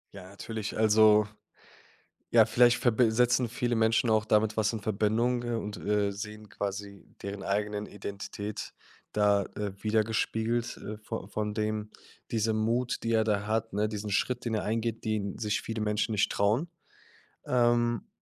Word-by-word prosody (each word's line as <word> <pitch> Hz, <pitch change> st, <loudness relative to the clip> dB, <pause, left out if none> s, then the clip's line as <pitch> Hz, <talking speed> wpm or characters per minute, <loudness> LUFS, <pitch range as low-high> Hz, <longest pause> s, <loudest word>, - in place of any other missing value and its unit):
Ja, 95 Hz, -2 st, -10 dB
natürlich, 105 Hz, +1 st, -5 dB
also, 110 Hz, -1 st, +5 dB, 1.0 s
ja, -, -, +7 dB
vielleicht 120 Hz, 0 st, +5 dB
verbi 120 Hz, -1 st, +3 dB
setzen 125 Hz, +1 st, +3 dB
viele 120 Hz, +1 st, -1 dB
Menschen 110 Hz, +1 st, +2 dB
auch 110 Hz, -1 st, +3 dB
damit 110 Hz, 0 st, +2 dB
was 110 Hz, +1 st, +2 dB
in 110 Hz, -, -3 dB
Verbindung 110 Hz, +4 st, +1 dB
und, 115 Hz, -3 st, -3 dB
äh, 105 Hz, -1 st, 0 dB
sehen 105 Hz, +1 st, -8 dB
quasi 100 Hz, -1 st, -5 dB, 0.2 s
deren 100 Hz, 0 st, -5 dB
eigenen 105 Hz, +1 st, -1 dB
Identität 100 Hz, +1 st, -6 dB, 0.4 s
da, 105 Hz, -1 st, +3 dB
äh, 105 Hz, -2 st, -3 dB
widergespiegelt, 110 Hz, +2 st, 0 dB
äh, 105 Hz, -, -7 dB
vo 110 Hz, -2 st, -5 dB
von 105 Hz, 0 st, -3 dB
dem 105 Hz, -1 st, -2 dB, 0.4 s
dieser 110 Hz, 0 st, +1 dB
Mut, 115 Hz, +3 st, 0 dB
die 115 Hz, -, -1 dB
er 110 Hz, -1 st, +3 dB
da 105 Hz, -1 st, 0 dB
hat, 110 Hz, 0 st, -1 dB
ne, 105 Hz, +2 st, +1 dB
diesen 105 Hz, -1 st, -5 dB
Schritt, 125 Hz, +4 st, 0 dB
den 115 Hz, -2 st, -1 dB
er 105 Hz, -, 0 dB
eingeht, 115 Hz, +1 st, -2 dB
den 105 Hz, -2 st, -2 dB
sich 105 Hz, -2 st, -1 dB
viele 115 Hz, -1 st, -5 dB
Menschen 105 Hz, +1 st, 0 dB
nicht 105 Hz, -, +2 dB
trauen? 110 Hz, +12 st, +1 dB, 0.8 s
Ähm, 120 Hz, -2 st, +2 dB
110 Hz, 155 wpm, -29 LUFS, 105-115 Hz, 1.0 s, ja